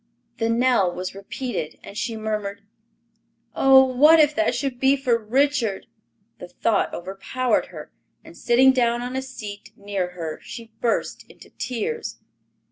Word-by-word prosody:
The 225 0 +1
knell 230 -5 +3
was 180 +1 -5
repeated, 200 -2 -5
and - - -11
she 225 +1 -3
murmured, 210 -2 -4 0.9
"Oh, 265 0 +7
what 295 +6 +6
if 300 -1 +5
that 325 - +1
should 270 -3 -3
be 270 +1 +4
for 255 -3 +1
Richard!" 230 -2 0 0.5
The 180 - -8
thought 205 +3 0
overpowered 195 +8 -2
her, - - -10 0.3
and - - -14
sitting 255 +2 +4
down 240 -2 +1
on 250 +1 -5
a 265 - -1
seat 215 -6 -9
near 195 -3 -3
her 165 -3 -5
she 230 -1 -10
burst 235 - -1
into - - -16
tears. 345 - -4
235 Hz, 145 wpm, -23 LUFS, 200-265 Hz, 0.9 s, Oh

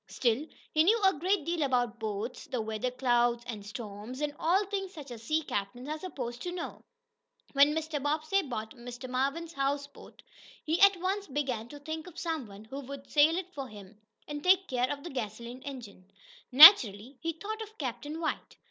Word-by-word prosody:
Still, 250 +5 0 0.2
he 310 - +4
knew 435 +7 +4
a 385 - +6
great 360 +2 0
deal 340 -1 -1
about 245 -4 0
boats, 220 +2 -4
the 250 - -3
weather 220 +2 -2
clouds 240 -1 +1
and 220 -4 -6
storms, 210 +2 -7
and 295 -1 -2
all 375 +5 +2
things 390 -1 -4
such 285 -4 -9
as 230 -2 -8
sea 310 +7 0
captains 225 +1 -4
are 310 +1 -3
supposed 250 -9 -6
to 355 - -4
know. 355 -1 -6 0.7
When 285 +2 +5
Mr. 315 -2 -2
Bobbsey 310 +7 +1
bought 220 - -5
Mr. 245 +1 -8
Marvin's 275 +6 -2
houseboat, 280 0 -4 0.4
he 320 +4 0
at 395 -1 +7
once 390 +3 -2
began 260 -5 -2
to 290 - -10
think 315 +3 -6
of 350 - -12
some 320 -8 -3
one 200 +1 -12
who 270 +5 -7
could 280 0 -9
sail 310 +3 +5
it 370 0 -5
for 275 -5 -5
him, 205 -1 -13 0.3
and 295 0 -6
take 375 +1 +4
care 250 0 0
of 285 -1 -5
the 345 - -7
gasoline 235 +1 -5
engine. 230 -9 -9 0.4
Naturally, 255 - +9
he 330 0 -2
thought 430 +7 -6
of 435 0 -9
Captain 290 +3 -5
White. 320 -2 -4
280 Hz, 190 wpm, -30 LUFS, 240-325 Hz, 0.7 s, Naturally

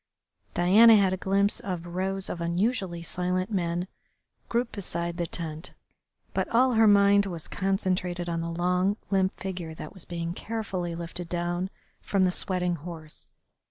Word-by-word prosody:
Diana 215 +6 +7
had 195 -3 +4
a - - +1
glimpse 195 +2 +1
of 180 -3 -4
rows 190 +2 -2
of 170 - -4
unusually 175 0 -1
silent 180 +3 -1
men 175 -2 -1 0.6
grouped 235 0 0
beside 170 -3 -3
the 170 -2 -1
tent, 160 0 -5 0.6
but - - -1
all 255 +2 +4
her 225 -1 +5
mind 200 0 +5
was 170 -4 -6
concentrated 185 -2 -1
on 165 -1 -1
the 165 - -3
long, 180 +4 +1
limp 190 -1 +3
figure 180 -4 -5
that 155 - -8
was 190 -4 -8
being 170 -1 -4
carefully 190 -5 -4
lifted 170 +1 -6
down 175 +1 -1 0.3
from 195 -2 +1
the 185 - +3
sweating 180 -1 0
horse. 160 -1 -9
180 Hz, 155 wpm, -27 LUFS, 170-195 Hz, 0.6 s, Diana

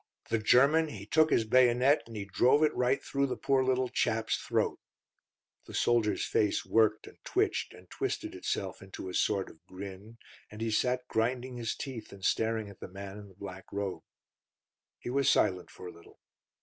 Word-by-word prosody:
The 115 - +2
German, 140 +9 +5
he 100 -9 -8
took 155 +8 +4
his 115 - +3
bayonet, 125 +4 +4
and 115 - -10
he 100 -2 -4
drove 125 +9 +3
it 155 - +3
right 125 +2 +1
through 140 0 0
the 130 - -3
poor 135 -1 +2
little 130 0 +1
chap's 110 -2 0
throat." - - -1 0.9
The - - -8
soldier's 115 -3 +2
face 105 -2 +1
worked 110 -1 +2
and - - -16
twitched - - 0
and 90 +1 -16
twisted - - -3
itself - - -3
into 95 -1 -8
a - - -7
sort 100 +1 +1
of 80 - -16
grin, 100 +4 -9 0.3
and 105 - -11
he 115 0 -1
sat 125 +3 0
grinding 125 +2 -1
his 115 -2 -2
teeth 125 -6 -7
and 95 -1 -8
staring 110 -1 +1
at 100 -2 -13
the - - -7
man 100 +2 -8
in 105 - -11
the 95 - -18
black 95 -1 -9
robe. 100 -2 -3 1.0
He 120 - -6
was 140 0 +2
silent 90 -1 +2
for - - -12
a 90 - -6
little. 85 0 -18
110 Hz, 190 wpm, -30 LUFS, 100-125 Hz, 1.0 s, German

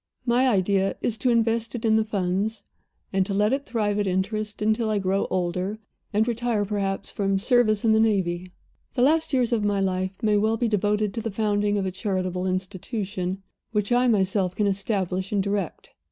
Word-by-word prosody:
"My 250 +2 +3
idea 195 -3 +2
is 225 -2 -1
to 255 - +1
invest 230 0 +1
it 235 - -4
in 220 -1 +4
the 220 - +3
Funds, 200 +1 -2 0.5
and 195 0 +3
to 195 - -2
let 210 +4 +2
it 280 +1 -2
thrive 210 -3 0
at 205 - 0
interest, 205 +3 -2
until 220 +1 +1
I 215 - +1
grow 195 0 0
older, 185 +3 -1 0.3
and 215 +2 +2
retire 235 -3 0
perhaps 195 -1 -2
from 195 -1 0
service 215 0 +2
in 225 - +5
the 220 - +4
Navy. 185 -5 +1 0.4
The 250 - +3
later 310 0 +3
years 245 -1 +1
of 220 -3 +1
my 205 -1 +1
life 190 0 -1
may 210 -1 +3
well 220 +2 +2
be 240 - +1
devoted 210 -1 +1
to 230 - -3
the 225 - -3
founding 205 0 0
of 195 - -1
a 190 - -1
charitable 185 -1 -2
institution, 185 0 -3 0.3
which 210 0 0
I 245 +1 +4
myself 190 -4 +1
can 210 - +1
establish 190 -2 -1
and 200 -2 +1
direct. 200 -3 -3
205 Hz, 195 wpm, -25 LUFS, 190-220 Hz, 0.5 s, in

